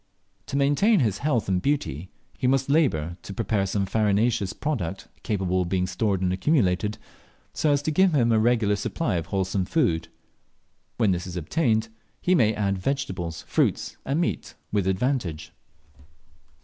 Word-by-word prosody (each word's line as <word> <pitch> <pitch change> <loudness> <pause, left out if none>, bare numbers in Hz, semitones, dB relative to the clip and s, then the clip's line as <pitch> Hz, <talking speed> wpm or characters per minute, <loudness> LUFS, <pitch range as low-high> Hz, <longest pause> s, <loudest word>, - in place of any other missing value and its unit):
To 140 - -2
maintain 145 +10 +3
his 105 -5 0
health 140 -7 0
and 95 -2 +1
beauty 95 - -1 0.3
he 125 - -1
must 135 +1 +2
labour 85 - +1
to 100 - -8
prepare 105 -3 0
some 100 +1 0
farinaceous 105 0 +1
product 100 - -3
capable 95 -3 0
of 90 - -2
being 90 -1 +1
stored 95 +1 -1
and 90 0 +1
accumulated, 105 - +1 0.6
so 155 - +1
as 145 0 +1
to 155 - 0
give 185 +1 +3
him 120 -4 +3
a 110 - +4
regular 110 -2 +2
supply 105 - -2
of 85 -1 -4
wholesome 95 -1 -1
food. 85 - +1 0.9
When 110 -5 +3
this 90 0 -2
is 90 0 -6
obtained, 110 - 0 0.3
he 185 - +2
may 110 - +3
add 100 -2 0
vegetables, 90 - -3
fruits, - - 0
and 140 +4 -1
meat 170 - -2 0.2
with 100 -3 0
advantage. 95 - -1
105 Hz, 160 wpm, -25 LUFS, 95-135 Hz, 0.9 s, a